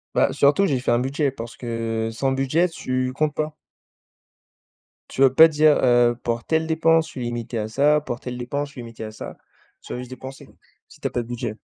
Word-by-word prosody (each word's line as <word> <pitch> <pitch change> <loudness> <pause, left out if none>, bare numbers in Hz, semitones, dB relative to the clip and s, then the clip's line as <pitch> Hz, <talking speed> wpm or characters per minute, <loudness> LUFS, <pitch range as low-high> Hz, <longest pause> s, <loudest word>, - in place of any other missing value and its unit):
Bah, - - +3
surtout, 145 +8 +4
j'ai 135 -8 +1
fait 125 - -1
un 120 - +3
budget 135 +2 0
parce 115 -3 -8
que 115 -2 -3
sans 135 +4 -1
budget, 135 +6 +1
tu 130 -6 -3
comptes 155 +1 0
pas. 155 0 -3 1.5
Tu 135 - -4
vas 135 - +7
pas 160 +5 +8
dire, 155 -1 +4
heu: 120 -1 +4
«Pour 115 0 -2
telle 160 0 0
dépense, 165 0 +3
je - - -12
suis 130 - -7
limité 120 0 -4
à 105 - -2
ça 145 +6 +3
pour 120 -5 -5
telle 125 -1 -6
dépense, 140 +4 -3
je - - -18
suis 125 - -8
limité 115 -1 -9
à 110 - -6
ça». 110 - -9 0.4
Tu - - -8
vas - - -4
juste 125 0 -8
dépenser 130 +1 -9 0.4
si - - -18
tu - - 0
as - - -3
pas 120 - -1
de 115 - -9
budget. 120 -3 -4
130 Hz, 225 wpm, -23 LUFS, 120-150 Hz, 1.5 s, pas